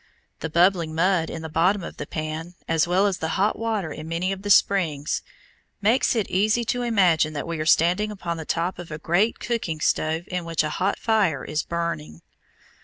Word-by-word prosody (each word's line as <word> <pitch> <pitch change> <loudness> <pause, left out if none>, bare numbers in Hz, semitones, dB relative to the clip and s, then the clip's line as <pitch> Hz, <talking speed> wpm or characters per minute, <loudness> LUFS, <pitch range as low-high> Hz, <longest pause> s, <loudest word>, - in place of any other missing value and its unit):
The 160 - -4
bubbling 170 -1 +2
mud 170 0 +2
in 160 - -6
the - - -4
bottom 175 +5 +2
of - - -8
the - - -6
pan, 155 +2 -5
as 165 0 +2
well 185 +3 +3
as 195 -3 0
the 160 - -2
hot 200 +3 +1
water 220 -8 -2
in 155 +1 -7
many 170 +3 -1
of 195 0 -4
the 205 - -5
springs, 165 -8 +2 0.6
makes 225 +5 +2
it 220 -4 0
easy 215 +5 +1
to 245 - -3
imagine 180 -10 +3
that 145 - -4
we 165 -1 -4
are 155 - -2
standing 180 +6 +3
upon 175 -5 -4
the 160 - -5
top 170 +3 -2
of 175 - -8
a 155 - -5
great 175 +8 +1
cooking 220 -10 -3
stove 160 +2 0
in 180 -1 -2
which 165 -2 0
a 150 - -2
hot 195 +2 +1
fire 200 - +1
is 155 0 -1
burning. 85 - -4
170 Hz, 205 wpm, -24 LUFS, 160-195 Hz, 0.6 s, well